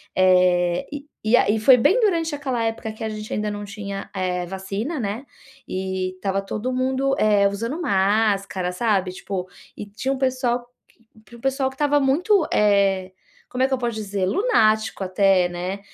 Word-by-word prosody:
eh, 180 +2 +3
e 290 0 -7 0.2
e 220 +3 +4
aí, 220 -2 +3
foi 250 +4 +7
bem 380 - +3
durante 335 -8 +1
aquela 265 -5 -2
época 225 0 -3
que 220 +1 -8
a 220 - -2
gente 215 0 -7
ainda 210 0 -1
não 205 0 -5
tinha, 200 -1 -7
eh, 180 -1 -1
vacina 195 - -4
né, 215 +6 -4 0.4
e 190 0 -3
estava 195 +1 -2
todo 215 +5 -4
mundo, 265 +1 0
eh, 205 -2 +4
usando 230 - -3
máscara 195 - +1
sabe, 195 -2 0
tipo, 185 0 -5 0.3
e 205 - -6
tinha 215 +7 -3
um 270 - -4
pessoal 250 -2 -1 0.6
q 235 - -15
um - - -17
pessoal 270 0 0
que 265 - -14
estava 290 +1 +2
muito, 330 +7 +2
eh, 195 -2 +2 0.4
como 250 - -3
é - - +4
que 270 - -2
eu 265 - +2
posso 240 -2 -2
dizer, 200 -3 -2
lunático 220 - +2
até, 185 -1 +3
né. 180 +3 -4
215 Hz, 175 wpm, -22 LUFS, 195-260 Hz, 0.6 s, foi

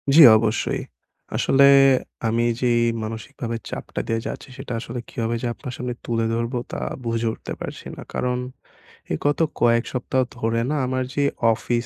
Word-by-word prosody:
জ্বী, 160 - +11
অবশ্যই। 110 0 0 0.5
আসলে 140 +1 +5 0.6
আমি 115 +1 +1 0.2
যেই 120 -2 +3 0.2
মানসিকভাবে 115 +2 -5
চাপটা - - -4
দিয়ে 115 0 0
যাচ্ছি - - -6
সেটা 135 -2 -6
আসলে 120 +1 -5
কিভাবে 115 0 -2
যে 125 - -1
আপনার 130 -2 -8
সামনে 125 -1 -3
তুলে 115 -1 0
ধরবো 115 +2 -1
তা - - -3 0.3
বুঝে 115 0 0
উঠতে - - -7
পারছি - - -6
না। - - -9
কারণ 125 0 0 0.7
এই 80 - +1
গত 145 -1 +2 0.2
কয়েক 115 0 +4
সপ্তাহ 130 +1 0 0.2
ধরে 115 0 0
না 155 - 0
আমার 130 0 0
যে 145 - +2 0.3
অফিস 120 +1 -1
120 Hz, 160 wpm, -23 LUFS, 115-130 Hz, 0.7 s, জ্বী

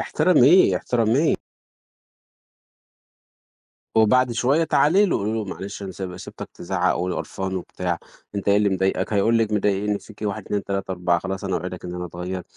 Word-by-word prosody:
احترميه، 175 0 +4
احترميه. 120 +6 +2 2.6
وبعد 120 +3 +4
شوية 135 +8 +2
تعالي 185 +7 +4
له - - +1
قولي 105 +2 -2
له: 110 -2 -2
"معلش 100 +1 -7
أنا 95 - -5
سي 90 -1 -6
سِبتك - - -9
تزعّق 90 +1 0
ول 90 +1 -2
قرفان 95 0 -4
وبتاع، 90 -1 -3 0.4
أنت 100 0 -3
إيه 100 - +5
اللي 105 -1 +3
مضايقك؟" 95 +2 0
هيقول 115 +3 +3
لك 110 -1 0
مضايقني 105 0 +1
فيكِ 105 +2 -15
1 105 0 -2
2 100 -1 -2
3 100 -1 -3
4، 90 -1 +1
"خلاص 95 +2 -5
أنا 95 -2 -1
أوعدك 90 0 -6
إن 90 0 -5
أنا 90 0 -4
أتغيّر." 90 +2 -5
100 Hz, 160 wpm, -23 LUFS, 95-110 Hz, 2.6 s, إيه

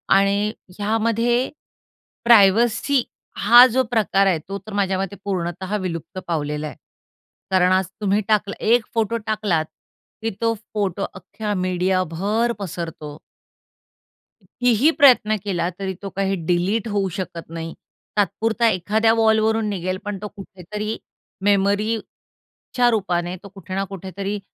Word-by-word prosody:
आणि 200 +2 +2 0.3
ह्यामध्ये 230 +3 +1 0.8
प्रायव्हसी 235 +4 +5 0.3
हा 240 +4 +8
जो 260 +2 +1
प्रकार 200 -4 +2
आहे 180 -4 +2
तो 195 - -3
तर 215 - -7
माझ्या 195 -2 0
मते 195 0 -3
पूर्णतः 185 +1 -2
विलुप्त 185 0 -5
पावलेला 150 -2 -2
आहे. - - -9 0.8
कारण 185 -1 +4
आज 185 0 +3 0.2
तुम्ही 205 +1 +2
टाकला 210 -2 +1
एक 230 0 +4
फोटो 225 0 0
टाकलात 205 -7 0 0.6
की 225 - -1
तो 230 0 +2 0.2
फोटो 200 -2 -1
अख्ख्या 210 +2 -5
मीडिया 185 0 +1
भर 215 +7 0
पसरतो. 165 -5 -6 1.2
कितीही 245 +4 +2
प्रयत्न 245 -6 +6
केला 175 -4 -1
तरी 190 -1 -3
तो 200 - -5
काही 195 0 0
डिलीट 185 +6 +1
होऊ 200 -2 0
शकत 170 -4 -6
नाही. 165 0 -6 0.4
तात्पुरता 220 +3 +1
एखाद्या 215 +4 +2
वॉलवरून 220 -1 +2
निघेल 185 -2 -2
पण 205 -1 -3
तो 210 - -4
कुठेतरी 205 +3 -6 0.5
मेमरीच्या 205 +4 -1
रूपाने 180 -4 -1
तो 200 - -10
कुठे 190 -1 -7
ना 195 - 0
कुठेतरी 195 +2 -4
200 Hz, 125 wpm, -22 LUFS, 185-220 Hz, 1.2 s, हा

